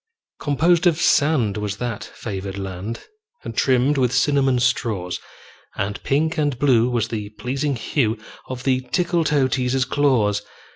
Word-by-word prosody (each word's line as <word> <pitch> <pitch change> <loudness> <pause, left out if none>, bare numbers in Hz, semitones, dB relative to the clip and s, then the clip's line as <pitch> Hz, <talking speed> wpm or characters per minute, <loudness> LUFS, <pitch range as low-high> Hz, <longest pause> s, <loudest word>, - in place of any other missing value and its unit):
Composed 165 +4 +3
of 165 -1 +2
sand 140 - +3
was 105 -1 -3
that 120 -3 -4
favored 100 -2 -6
land, 95 +3 -5 0.4
And - - -6
trimmed 135 +2 +2
with 125 -2 +2
cinnamon 135 0 +2
straws; 100 -7 0 0.6
And 100 +1 -3
pink 160 +4 0
and 145 -4 0
blue 125 -3 +3
was 115 -3 0
the 105 -3 -4
pleasing 135 +3 -1
hue 115 -2 0 0.3
Of 130 -1 -6
the 130 -1 +2
Tickletoeteaser's 135 -4 +1
claws. 120 -9 +2
125 Hz, 135 wpm, -22 LUFS, 110-145 Hz, 0.6 s, Composed